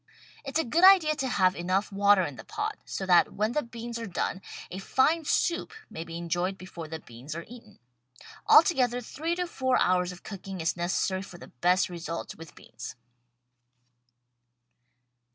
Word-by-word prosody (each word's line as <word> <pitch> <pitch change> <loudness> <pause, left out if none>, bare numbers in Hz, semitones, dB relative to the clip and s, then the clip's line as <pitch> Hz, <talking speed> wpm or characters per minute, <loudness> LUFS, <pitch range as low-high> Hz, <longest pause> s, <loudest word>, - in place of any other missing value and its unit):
It's 275 +2 -2
a 320 - +2
good 320 +9 +1
idea 370 -5 +7
to 265 - -1
have 185 -7 +2
enough 185 +4 -1
water 200 -1 +4
in 145 -5 -4
the - - -10
pot 425 0 -4
so 190 - -4
that 175 -2 +4
when 215 +2 0
the 300 - 0
beans 235 -1 -7
are 230 - -5
done 185 +1 -2 0.3
a 185 - -5
fine 310 +10 +2
soup 340 +3 0 0.2
may 160 - -5
be 165 0 -7
enjoyed 175 +3 -2
before 175 -3 -9
the 160 +1 -5
beans 125 +4 -10
are 170 - -6
eaten. 225 -3 -14 0.7
Altogether 250 -7 +5
three 325 +7 -3
to 360 0 -1
four 260 -6 0
hours 180 0 +2
of 180 - -12
cooking 195 -2 -7
is 165 -1 0
necessary 180 +2 -1
for 185 -2 -10
the - - -12
best 180 +9 +2
results 170 -1 -6
with 165 -1 -12
beans. 130 - -10
195 Hz, 170 wpm, -28 LUFS, 175-260 Hz, 0.7 s, idea